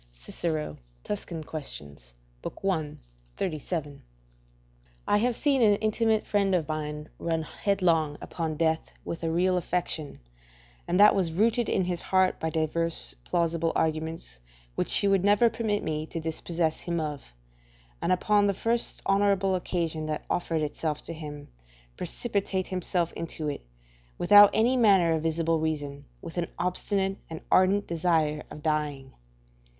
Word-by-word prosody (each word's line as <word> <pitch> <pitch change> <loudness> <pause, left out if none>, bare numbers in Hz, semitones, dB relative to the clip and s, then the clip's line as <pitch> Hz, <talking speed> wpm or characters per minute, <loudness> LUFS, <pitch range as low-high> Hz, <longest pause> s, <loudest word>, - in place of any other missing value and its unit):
Cicero, 150 - -4 0.3
Tusc. 205 -3 -4
Quaes., 70 - -7 0.3
i. 160 -6 -2 0.4
37.] 155 -3 -3 1.0
I 205 - +4
have 240 +2 +1
seen 275 -1 +2
an 210 -3 +6
intimate 220 +1 +1
friend 200 -2 +2
of 165 -4 0
mine 150 -1 -4
run 165 -1 -1
headlong 165 -5 +1
upon 160 -2 -4
death 160 0 0
with 170 - -5
a 165 - -1
real 180 +2 +2
affection, 170 -4 -2 0.7
and 180 +2 +1
that 210 +1 +8
was 185 -4 0
rooted 225 +6 +2
in 190 - +2
his 175 -1 -2
heart 185 -1 +2
by 160 - -1
divers 160 +1 -1
plausible 165 - 0
arguments 160 - -2 0.3
which - - -1
he 200 - +2
would 195 -2 +3
never 205 +3 +4
permit 220 -2 -1
me 155 0 -2
to 165 - -5
dispossess 160 0 -2
him 170 -1 -2
of, 150 -3 -3 0.8
and - - 0
upon 205 +3 +3
the 200 - +1
first 230 +4 0
honourable 195 -1 +2
occasion 165 -4 -2
that 155 -1 -3
offered 165 -3 0
itself 150 0 -3
to - - -5
him, 150 -2 -8 0.5
precipitate 185 - -2
himself 180 -2 -1
into 160 -2 -4
it, 145 - -5 0.6
without 205 0 +8
any 240 +4 +3
manner 195 -8 +5
of 160 - 0
visible 165 0 +1
reason, 145 -3 -3 0.2
with 170 0 -8
an 170 - -1
obstinate 195 +1 -1
and 160 -1 -7
ardent 195 +2 +4
desire 160 -3 +1
of 150 - -10
dying. 150 -4 -2
170 Hz, 145 wpm, -27 LUFS, 155-195 Hz, 1.0 s, that